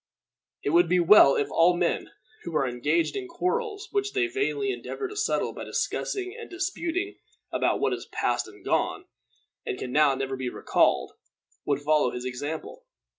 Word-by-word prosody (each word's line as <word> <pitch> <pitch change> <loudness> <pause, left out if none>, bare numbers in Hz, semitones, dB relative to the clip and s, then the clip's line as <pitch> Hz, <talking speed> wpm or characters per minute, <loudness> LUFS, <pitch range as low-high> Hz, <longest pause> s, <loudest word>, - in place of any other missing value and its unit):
It 145 - 0
would 170 +1 +4
be 180 0 +4
well 170 -5 +7
if 145 - -1
all 175 +1 +4
men 175 -1 0 0.3
who 170 -2 -6
are 135 -3 +2
engaged 150 +7 0
in 390 -2 -4
quarrels 410 +5 -2
which 405 0 -1
they 390 -2 +2
vainly 405 +2 -1
endeavor 405 +1 -5
to 420 - -9
settle 430 +2 0
by - - -7
discussing 370 0 -2
and 460 -1 -9
disputing 365 +1 -3 0.3
about - - +1
what - - +1
is - - -6
past - - -1
and - - -15
gone, 380 - 0 0.6
and 425 -5 -3
can 125 - -5
now 145 -1 +4
never 135 0 -3
be 130 -1 -3
recalled, - - +1 0.5
would 145 -1 0
follow 150 -2 +3
his 125 +1 -6
example. 155 - -5
185 Hz, 175 wpm, -27 LUFS, -, 0.6 s, well